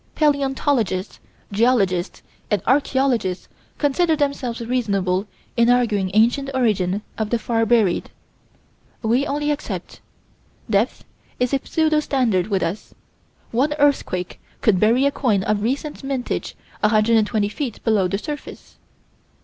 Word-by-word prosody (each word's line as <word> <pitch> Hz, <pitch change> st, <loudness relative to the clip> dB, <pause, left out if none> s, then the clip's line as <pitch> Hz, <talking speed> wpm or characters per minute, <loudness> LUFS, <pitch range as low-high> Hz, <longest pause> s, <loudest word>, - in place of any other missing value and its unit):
Palaeontologists, 270 Hz, -, 0 dB, 0.3 s
geologists, 200 Hz, -5 st, +1 dB, 0.3 s
and 205 Hz, -4 st, 0 dB
archaeologists 260 Hz, -7 st, +1 dB, 0.3 s
consider 315 Hz, +3 st, +2 dB
themselves 280 Hz, -5 st, -2 dB
reasonable 205 Hz, -6 st, 0 dB, 0.3 s
in 235 Hz, 0 st, +4 dB
arguing 225 Hz, -6 st, +2 dB
ancient 240 Hz, +5 st, +3 dB
origin 205 Hz, -5 st, +1 dB, 0.2 s
of 215 Hz, -1 st, -1 dB
the 235 Hz, -, +1 dB
far 225 Hz, 0 st, 0 dB
buried. 220 Hz, -6 st, +2 dB, 0.9 s
We 240 Hz, +5 st, +2 dB
only 295 Hz, +1 st, 0 dB
accept: 295 Hz, -, -5 dB, 0.7 s
depth 220 Hz, +2 st, 0 dB, 0.4 s
is 250 Hz, +1 st, 0 dB
a 275 Hz, -, +3 dB
pseudo 315 Hz, -1 st, +2 dB
standard 235 Hz, -11 st, +1 dB
with 195 Hz, -4 st, 0 dB
us; 190 Hz, +6 st, -4 dB, 0.6 s
one 270 Hz, +6 st, +1 dB
earthquake 285 Hz, -11 st, 0 dB, 0.2 s
could 200 Hz, -5 st, +3 dB
bury 235 Hz, +6 st, +3 dB
a 280 Hz, -, +3 dB
coin 215 Hz, -9 st, +1 dB
of 210 Hz, 0 st, 0 dB
recent 275 Hz, +6 st, -3 dB
mintage 270 Hz, -2 st, -3 dB, 0.2 s
120 215 Hz, -1 st, +2 dB
feet 245 Hz, 0 st, -4 dB
below 210 Hz, -5 st, +2 dB
the 195 Hz, -, -1 dB
surface. 295 Hz, +6 st, -8 dB
235 Hz, 120 wpm, -21 LUFS, 205-275 Hz, 0.9 s, in